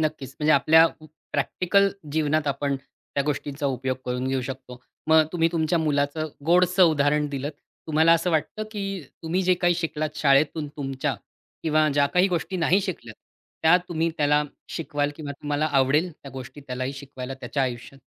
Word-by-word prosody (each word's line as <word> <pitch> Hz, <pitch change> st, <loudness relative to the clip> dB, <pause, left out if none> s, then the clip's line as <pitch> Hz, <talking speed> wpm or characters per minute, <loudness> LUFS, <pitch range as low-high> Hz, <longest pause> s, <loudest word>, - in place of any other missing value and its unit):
नक्कीच. 150 Hz, -4 st, -3 dB
म्हणजे, 155 Hz, 0 st, +3 dB
आपल्या 160 Hz, +4 st, +6 dB
अ, -, -, +4 dB, 0.4 s
प्रॅक्टिकल 200 Hz, +2 st, +2 dB, 0.2 s
जीवनात 155 Hz, -1 st, +1 dB
आपण 140 Hz, 0 st, -1 dB
त्या 140 Hz, +1 st, -6 dB
गोष्टींचा 145 Hz, 0 st, -2 dB
उपयोग 130 Hz, -1 st, -1 dB
करून 125 Hz, +1 st, -2 dB
घेऊ 135 Hz, -1 st, 0 dB
शकतो. 130 Hz, -1 st, -8 dB, 0.3 s
मग 160 Hz, -1 st, +5 dB
तुम्ही 165 Hz, -1 st, +2 dB
तुमच्या 165 Hz, +1 st, +1 dB
मुलाचं 150 Hz, 0 st, 0 dB, 0.2 s
गोडसं 180 Hz, +2 st, +4 dB
उदाहरण 150 Hz, 0 st, +2 dB
दिलत. 140 Hz, +1 st, -3 dB, 0.4 s
तुम्हाला 160 Hz, +1 st, +4 dB
असं 170 Hz, +2 st, +2 dB
वाटतं, 160 Hz, +7 st, -1 dB
की 195 Hz, -3 st, -4 dB, 0.2 s
तुम्ही 175 Hz, +4 st, 0 dB
जे 185 Hz, 0 st, +3 dB
काही 175 Hz, -1 st, +2 dB
शिकलात 155 Hz, -2 st, -3 dB
शाळेतून 145 Hz, +2 st, +2 dB
तुमच्या, 135 Hz, -1 st, -2 dB, 0.5 s
किंवा 155 Hz, -1 st, +3 dB
ज्या 140 Hz, -1 st, +4 dB
काही 180 Hz, +2 st, +4 dB
गोष्टी 180 Hz, +2 st, -2 dB
नाही 175 Hz, +4 st, +3 dB
शिकल्यात. 140 Hz, -, -6 dB, 0.5 s
त्या 160 Hz, +2 st, +7 dB
तुम्ही 165 Hz, -1 st, 0 dB
त्याला 150 Hz, 0 st, +3 dB, 0.3 s
शिकवाल 145 Hz, -3 st, -2 dB
किंवा 145 Hz, -3 st, -6 dB
तुम्हाला 145 Hz, +1 st, 0 dB
आवडेल 145 Hz, +4 st, +2 dB
त्या 140 Hz, -2 st, -13 dB
गोष्टी 130 Hz, +2 st, -9 dB
त्यालाही 130 Hz, +1 st, -3 dB
शिकवायला 135 Hz, -1 st, -7 dB
त्याच्या 140 Hz, +1 st, -3 dB
आयुष्यात? 125 Hz, +2 st, -4 dB
150 Hz, 160 wpm, -25 LUFS, 140-165 Hz, 0.5 s, त्या